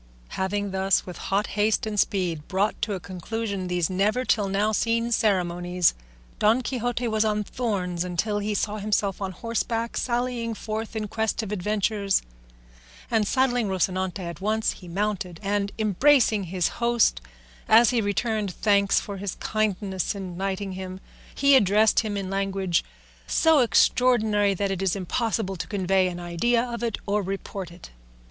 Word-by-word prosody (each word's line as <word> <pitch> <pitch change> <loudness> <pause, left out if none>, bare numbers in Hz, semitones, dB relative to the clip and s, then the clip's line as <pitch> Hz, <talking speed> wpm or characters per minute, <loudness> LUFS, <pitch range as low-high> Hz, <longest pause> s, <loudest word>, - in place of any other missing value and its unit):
Having 200 +1 -2
thus, 190 0 +1
with 180 - -8
hot 200 +2 +2
haste 210 +2 +1
and 210 -1 -2
speed, 175 -7 0
brought 200 +3 0
to 210 -3 -1
a - - -5
conclusion 195 +2 -4
these 175 -2 0
never 210 +7 0
till 210 -5 +2
now 200 +2 +1
seen 230 +2 0
ceremonies, 180 -4 +1 0.5
Don 225 +4 +3
Quixote 245 -1 -2
was 220 -1 +1
on 210 -1 0
thorns 190 -7 -2
until 180 +4 -1
he 210 0 -2
saw 210 +1 -1
himself 205 -1 -1
on 190 -1 -2
horseback 230 +3 -2
sallying 240 -2 -1
forth 220 +1 -5
in 215 -1 -2
quest 220 +2 -1
of 210 - -6
adventures; 205 0 0 0.9
and 220 -2 +2
saddling 245 -3 +2
Rocinante 190 0 -1
at 170 -1 -7
once 215 +2 +1
he 180 - -12
mounted, 190 -1 -2
and 200 0 0
embracing 220 0 +3
his 180 0 0
host, 235 - +3 0.5
as 230 +2 +7
he 240 -2 +2
returned 210 0 -1
thanks 200 -2 +3
for 200 -2 -7
his 195 -1 -4
kindness 205 -3 -1
in 185 -3 -6
knighting 195 +1 -3
him, 185 0 -6 0.4
he 280 0 +5
addressed 210 -2 +4
him 210 -3 -2
in 195 -1 -3
language 195 -2 0 0.4
so 320 -2 +4
extraordinary 220 -5 +3
that 200 +1 -1
it 190 -1 -3
is 190 -1 +1
impossible 200 +1 -1
to 170 - -5
convey 190 -2 +1
an 175 -1 -5
idea 175 +8 +1
of 235 -1 -5
it 230 -3 -1
or 205 +1 +1
report 195 -1 -5
it. 170 +1 -13
205 Hz, 160 wpm, -25 LUFS, 190-220 Hz, 0.9 s, as